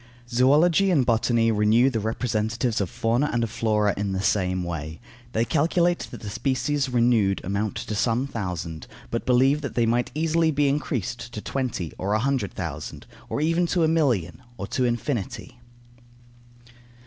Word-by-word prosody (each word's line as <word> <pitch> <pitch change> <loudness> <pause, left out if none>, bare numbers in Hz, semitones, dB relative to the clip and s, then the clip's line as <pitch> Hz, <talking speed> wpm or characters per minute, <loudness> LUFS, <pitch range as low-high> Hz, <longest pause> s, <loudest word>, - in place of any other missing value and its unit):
Zoology 150 +10 +4
and 145 -9 +3
botany 115 0 +2
renew 110 +5 +3
the 115 - -1
representatives 110 +1 -1
of 95 - -2
fauna 120 - 0
and 120 0 0
of 115 - -3
flora 105 -2 +1
in 100 -1 -2
the 95 - -1
same 90 -3 +1
way. 80 -2 -5 0.3
They 115 +1 +1
calculate 170 +6 +1
that - - -10
the 105 - -6
species 135 +4 -1
renewed 115 -5 +2
amount 100 +3 -2
to 110 - -4
some 115 +4 +1
thousand, 90 - -5 0.2
but 115 - -3
believe 135 +4 +4
that 140 - -5
they 120 - +3
might 120 +1 +1
easily 165 +1 +2
be 145 -1 +2
increased 125 - -3
to - - -4
twenty 120 - -3
or 100 +2 -1
a - - +2
hundred 130 -4 0
thousand, - - -6 0.2
or - - -2
even 165 +3 +2
to 170 0 +1
a - - +4
million, 130 - +1 0.2
or 100 - -4
to 130 - 0
infinity. 120 0 -3
120 Hz, 165 wpm, -25 LUFS, 105-140 Hz, 0.3 s, Zoology